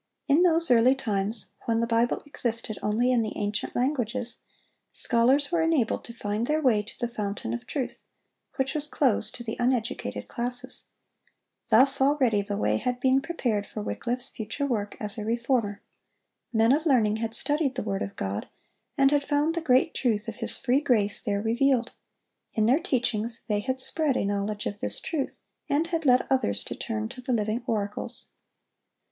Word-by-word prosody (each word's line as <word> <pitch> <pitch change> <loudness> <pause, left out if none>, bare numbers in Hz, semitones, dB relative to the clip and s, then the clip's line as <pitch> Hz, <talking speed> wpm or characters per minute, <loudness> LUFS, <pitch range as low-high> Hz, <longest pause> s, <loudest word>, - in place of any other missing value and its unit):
In 295 +3 +4
those 335 -4 +4
early 245 +2 +5
times, 215 -3 0
when 230 -1 +1
the 230 - +1
Bible 230 +1 +1
existed 230 -6 -2
only 230 +4 +1
in 245 -2 +3
the 215 -1 -4
ancient 205 +1 -2
languages, 250 -2 -1 0.5
scholars 260 +5 +3
were 340 -1 +2
enabled 320 -8 +1
to - - -7
find 215 0 -3
their 305 +1 +1
way 250 -8 +3
to 210 - -11
the 240 - 0
fountain 205 - -4
of 120 - -6
truth, 265 -4 -4 0.5
which 265 0 -1
was 300 -1 -2
closed 265 -7 +1
to 240 - -7
the 225 -1 -4
uneducated 230 - -1
classes. 245 +2 -3 0.8
Thus 270 +4 +5
already 265 -7 +3
the 200 0 -4
way - - +1
had 250 -1 -2
been 260 +1 +3
prepared 240 -10 -2
for 210 - -6
Wycliffe's 245 +4 -3
future 220 +5 -4
work 210 -6 -2
as 210 +1 -3
a - - -3
Reformer. 230 -2 -1 0.7
Men 225 0 +3
of 310 +4 +2
learning 220 -6 +3
had 225 0 -3
studied 295 -3 0
the 255 - -2
word 200 -1 -2
of 200 - -4
God, 100 +2 -4 0.5
and 275 -1 +5
had 290 -1 +2
found 290 +3 +1
the 335 - -2
great 260 -5 +3
truth 225 -4 0
of 225 - -6
His 230 -2 -1
free 265 +2 +1
grace 210 -8 +2
there 200 -2 -1
revealed. 240 +2 +2 0.6
In 215 -2 +2
their 255 +7 +4
teachings 235 - -1
they 210 -2 +1
had 260 +5 -2
spread 285 0 +4
a - - 0
knowledge 205 +1 -2
of 205 - -4
this - - -2
truth, 300 -5 -4 0.3
and 295 +3 +2
had 330 -3 -2
led 250 0 +5
others 265 -1 +1
to - - -5
turn 220 -2 -3
to 255 +1 -9
the 255 +1 -3
Living 215 +1 0
Oracles. 210 -3 -2
240 Hz, 180 wpm, -27 LUFS, 215-270 Hz, 0.8 s, early